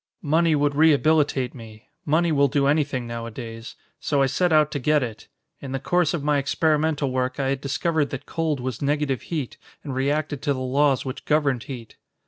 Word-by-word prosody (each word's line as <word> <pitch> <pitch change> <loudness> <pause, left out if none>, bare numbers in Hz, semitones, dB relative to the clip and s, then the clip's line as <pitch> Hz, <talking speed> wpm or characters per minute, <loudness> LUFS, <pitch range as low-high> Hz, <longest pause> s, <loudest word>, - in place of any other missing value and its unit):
Money 160 +1 +3
would 145 0 +1
rehabilitate 150 -3 +3
me 110 -3 -12 0.2
money 165 +3 +2
will 140 -2 +4
do 140 +1 +1
anything 145 -3 +1
nowadays 115 0 -7 0.2
so 145 -2 0
I 135 - +4
set 170 +7 +1
out 155 -1 +4
to 145 - -2
get 150 +2 +2
it. 115 -3 -7 0.3
In 135 -1 -7
the 135 - -1
course 175 +3 +1
of 150 - -4
my 145 -1 +2
experimental 150 0 +1
work, 130 +1 -2
I 135 -1 0
had 135 -1 -1
discovered 145 +2 0
that 135 +1 -6
cold 160 -4 -2
was 125 -2 -4
negative 145 -2 0
heat 150 -7 -4 0.3
and 140 - -5
reacted 145 +2 -1
to 145 -2 +1
the - - -5
laws 135 +2 +1
which 130 - -6
governed 145 -5 +1
heat." 120 -5 -9
140 Hz, 190 wpm, -24 LUFS, 130-150 Hz, 0.3 s, will